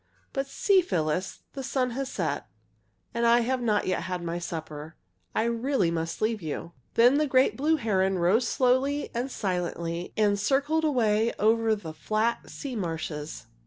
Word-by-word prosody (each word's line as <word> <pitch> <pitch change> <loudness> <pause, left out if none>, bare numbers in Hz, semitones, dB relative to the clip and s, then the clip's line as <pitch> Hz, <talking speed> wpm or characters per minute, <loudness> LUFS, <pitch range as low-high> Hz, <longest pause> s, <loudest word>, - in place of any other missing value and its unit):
"But 270 -1 -1
see, 385 +7 +3
Phyllis, 180 - -2
the 275 - -5
sun 255 -1 0
has 270 +2 -3
set, - - -2 0.7
and 235 - -1
I 235 +1 +5
have 255 +2 0
not 215 -3 +1
yet 185 - 0
had 180 -1 -4
my 170 0 -3
supper. 160 -2 -6 0.4
I - - +2
really 235 -5 +1
must 165 +3 -3
leave 220 -1 0
you!" 160 +1 -5 0.2
Then 245 +5 +6
the 305 - +2
great 260 -1 +3
blue 305 +4 +2
heron 195 -8 +1
rose 195 +8 +3
slowly 265 +4 +1
and 245 +3 -2
silently 175 -5 -3
and 205 -2 +3
circled 285 +8 +1
away 225 -6 +2
over 225 +1 +3
the 165 -7 -8
flat 215 +9 -1
sea 275 -4 -6
marshes. 160 - -4
220 Hz, 160 wpm, -27 LUFS, 175-260 Hz, 0.7 s, Then